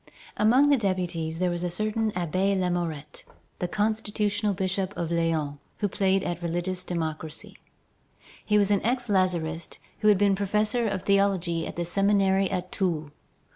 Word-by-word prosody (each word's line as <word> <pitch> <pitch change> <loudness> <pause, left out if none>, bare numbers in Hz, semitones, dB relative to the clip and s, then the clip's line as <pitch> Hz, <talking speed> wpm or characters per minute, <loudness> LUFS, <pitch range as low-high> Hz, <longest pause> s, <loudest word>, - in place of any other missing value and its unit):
Among 255 +7 +4
the 285 - +5
deputies 175 -5 -1
there 180 0 +1
was 175 0 -3
a 175 - 0
certain 215 +4 -1
Abbé 185 +3 0
Lamourette, 170 -5 -2 0.4
the 180 - -1
constitutional 210 0 0
bishop 190 +1 -2
of 170 -1 -2
Lyons, 160 -4 0 0.2
who 205 - 0
played 195 -1 +1
at 175 0 -3
religious 175 +2 -2
democracy. 160 -3 -4 0.9
He 210 - +2
was 205 0 +4
an 200 - +3
ex 245 +1 0
Lazarist 170 -4 0 0.2
who 215 - +1
had 210 -2 +6
been 200 0 +3
professor 210 +4 +1
of 195 -3 -2
theology 190 -5 +1
at - - -7
the 175 - -2
Seminary 195 +1 +2
at 180 0 -3
Toul. 160 -6 -1
185 Hz, 155 wpm, -26 LUFS, 170-205 Hz, 0.9 s, had